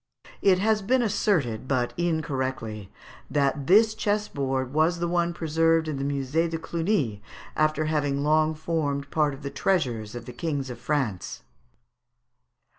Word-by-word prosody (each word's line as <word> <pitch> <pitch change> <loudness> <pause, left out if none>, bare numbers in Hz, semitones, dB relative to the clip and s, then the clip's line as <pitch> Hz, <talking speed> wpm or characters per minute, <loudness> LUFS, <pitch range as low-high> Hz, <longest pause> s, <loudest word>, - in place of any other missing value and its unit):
It 190 -2 +5
has 215 +2 +2
been 245 +5 +2
asserted, 160 - 0
but 125 -3 0
incorrectly, 130 - -2 0.4
that 140 -1 0
this 215 +4 +6
chessboard 140 - -1
was 160 +3 +2
the 170 0 -1
one 170 0 +1
preserved 165 0 +1
in 150 -3 -2
the 135 - -3
Musée 140 +4 0
de 165 - -2
Cluny, 160 - -1 0.3
after 155 0 +1
having 145 -2 0
long 155 +1 +3
formed 150 -3 -2
part 150 -3 +1
of 135 - -14
the 140 - -4
treasures 125 - -1
of 120 -1 -7
the 125 - -8
Kings 140 -1 -3
of 120 - -8
France. 125 - -2
155 Hz, 145 wpm, -26 LUFS, 135-170 Hz, 0.4 s, this